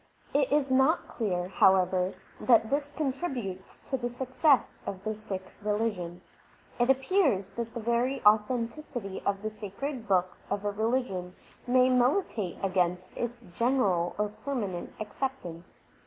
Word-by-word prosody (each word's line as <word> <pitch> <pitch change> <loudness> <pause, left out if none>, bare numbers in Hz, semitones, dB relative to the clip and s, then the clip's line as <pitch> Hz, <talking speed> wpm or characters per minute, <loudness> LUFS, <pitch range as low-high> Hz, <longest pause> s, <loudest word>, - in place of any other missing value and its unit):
It 280 -2 +2
is 285 -2 +2
not 265 +6 +3
clear, 180 -6 -2
however, 185 -1 +3 0.2
that 225 -2 +4
this 285 +1 0
contributes 265 - -3
to 265 - -1
the 240 -1 -2
success 260 +3 +2
of 190 -1 -5
the 215 0 -1
Sikh 195 -3 -6
religion. 205 -5 -1 0.6
It 240 +1 +3
appears 270 - +2
that 235 0 -5
the - - -2
very 235 +4 +1
authenticity 230 0 +1
of 200 0 0
the 215 - -2
sacred 225 +4 -5
books 185 -2 +1
of 200 0 -2
a 205 - +1
religion 205 -5 -1 0.3
may 255 +1 +5
militate 250 - +1
against 180 -1 0
its 240 0 -4
general 200 -8 +1
or 210 0 0
permanent 205 -11 -3
acceptance. 210 -6 -5
225 Hz, 135 wpm, -29 LUFS, 190-260 Hz, 0.6 s, may